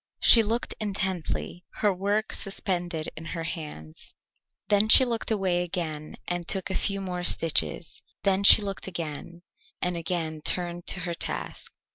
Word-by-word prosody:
She 230 - +9
looked 225 +2 -2
intently, 190 -3 -3
her 205 -2 +1
work 205 +4 -1
suspended 175 -5 -3
in 160 - -9
her 165 +1 -5
hands. 150 - -8 0.5
Then 205 +1 +3
she 260 - +9
looked 235 -2 -2
away 190 -5 0
again 160 -3 -5
and 175 -1 -3
took 190 0 0
a - - -1
few 200 +1 -1
more 180 -2 -4
stitches, 165 0 +1 0.2
then 195 0 +2
she 205 +1 +9
looked 195 -1 -5
again, 170 0 -7 0.4
and 180 0 -1
again 165 -2 -3
turned 175 +1 -2
to 180 - 0
her 170 0 -3
task. 165 - -5
180 Hz, 150 wpm, -26 LUFS, 165-200 Hz, 0.5 s, She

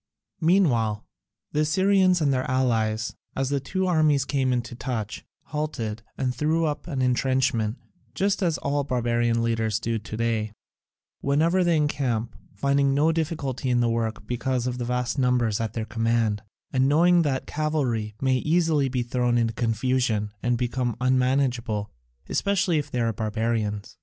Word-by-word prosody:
Meanwhile 130 - +2 0.5
the 150 - -1
Assyrians 185 +3 +3
and 140 -3 +3
their 130 -1 -1
allies, 115 -4 0 0.2
as 135 0 -1
the 140 0 +1
two 185 +8 -2
armies 155 -6 +3
came 135 -3 0
into 120 -1 -2
touch, 115 -3 -4 0.2
halted, 120 -8 -4 0.2
and 130 -2 -1
threw 160 +4 +1
up 150 +2 -3
an 135 -6 -1
entrenchment, 125 -2 +1 0.4
just 200 +5 +1
as 170 -4 +1
all 140 0 -1
barbarian 120 -3 +1
leaders 110 -2 0
do 115 -1 -2
to 110 +1 -7
day, 110 -2 -1 0.7
whenever 165 +6 +2
they 170 -2 +3
encamp, 130 -6 -1 0.2
finding 140 0 +2
no 155 +3 +3
difficulty 145 -5 -2
in 120 -1 +3
the 120 -1 +2
work 115 -1 -2
because 125 0 -1
of 125 0 -2
the 120 - -2
vast 125 +1 -1
numbers 125 -4 +2
at 110 -1 -3
their 110 -2 -3
command, 115 -1 0 0.3
and 130 0 +3
knowing 175 +4 +5
that 140 -5 -1
cavalry 130 -9 -1
may 130 -1 +2
easily 155 -2 +2
be 125 -1 -1
thrown 120 0 0
into 115 -1 +1
confusion 115 -2 0
and 120 0 +1
become 120 -1 -1
unmanageable, 125 -4 +1 0.4
especially 190 -5 +1
if 145 0 -5
they 125 - -2
are 115 -1 +1
barbarians. 110 -2 -2
125 Hz, 155 wpm, -25 LUFS, 115-145 Hz, 0.7 s, knowing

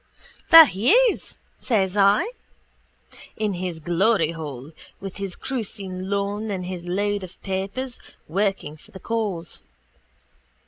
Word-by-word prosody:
—There 325 -1 +12
he 220 - +1 0.2
is, - - -7 0.2
says 195 -6 0
I, 205 - +4 1.1
in 215 -2 -1
his 180 -2 -4
gloryhole, 160 - 0 0.3
with 195 -1 -7
his 195 -3 -4
cruiskeen 195 -7 -5
lawn 200 +2 -2
and 185 -3 -3
his 180 -1 -6
load 205 +2 -1
of 185 - -11
papers, 200 +7 -4 0.3
working 190 -4 -1
for - - -19
the 190 - -11
cause. 205 -8 -3
195 Hz, 120 wpm, -23 LUFS, 180-210 Hz, 1.1 s, There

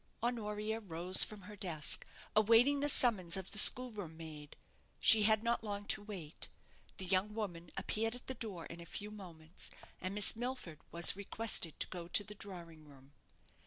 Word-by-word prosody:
Honoria 220 -2 -3
rose 180 -2 +6
from 210 -2 -8
her 210 +3 -11
desk, 170 -7 +2 0.3
awaiting 230 +6 +4
the 290 +1 +1
summons 200 -10 +4
of 190 -1 -7
the 210 - +1
schoolroom 210 -10 +3
maid. 155 -3 -11 0.4
She 220 - +5
had 220 +1 +3
not 235 -1 -1
long 205 -1 -5
to 215 - +1
wait. 190 -7 -9 0.5
The 190 - -6
young 190 +3 0
woman 175 -6 -6
appeared 225 +2 -2
at 245 - -13
the 260 - -5
door 205 -9 -6
in 170 0 -10
a - - -11
few 205 +4 -6
moments, 170 -5 -7 0.3
and 185 +2 -5
Miss 210 +1 +4
Milford 240 - -6
was 170 +1 +3
requested 200 -4 +1
to - - 0
go 175 -2 -8
to 190 - +3
the 210 - -10
drawing 170 -6 -7
room. 140 -1 -19
200 Hz, 175 wpm, -34 LUFS, 170-220 Hz, 0.5 s, rose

